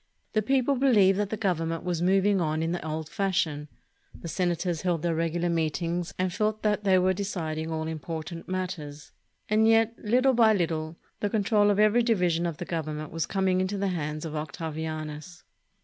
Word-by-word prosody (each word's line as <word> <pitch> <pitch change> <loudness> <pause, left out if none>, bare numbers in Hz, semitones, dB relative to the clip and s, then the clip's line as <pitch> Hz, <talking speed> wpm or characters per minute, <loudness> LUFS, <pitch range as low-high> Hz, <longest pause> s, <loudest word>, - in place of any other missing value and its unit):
The 215 - +2
people 265 +4 +2
believed 205 -7 +4
that 205 -1 0
the 220 - -3
Government 165 -5 -1
was 175 -2 -2
moving 195 +1 +3
on 155 0 0
in 165 - -1
the 175 - -3
old 155 0 -4
fashion, 175 -7 -1 0.5
the - - -7
senators 175 -1 -1
held 175 -4 -1
their 170 -1 +1
regular 165 +1 0
meetings 170 +1 -1
and 185 -1 -1
felt 215 +2 -1
that 210 -1 +1
they 190 -2 +4
were 185 +1 +3
deciding 165 -5 -3
all 160 -1 -2
important 160 +2 -6
mat 185 0 -1
ters; 150 -4 -9 0.4
and 215 +1 +3
yet, 225 0 +4
Httle 255 +4 +3
by 225 -2 +5
little, 160 -3 -2 0.2
the 205 - 0
control 205 0 +3
of 205 - +2
every 215 +3 +4
divi 220 -7 +2
sion 170 +1 0
of 165 -3 -4
the 175 - -5
Government 155 -2 -4
was 165 0 -2
coming 190 -1 +1
into 190 +2 -2
the 195 0 0
hands 155 -3 -3
of 155 -1 -5
Octavianus. 155 +1 -5
175 Hz, 190 wpm, -27 LUFS, 160-205 Hz, 0.5 s, by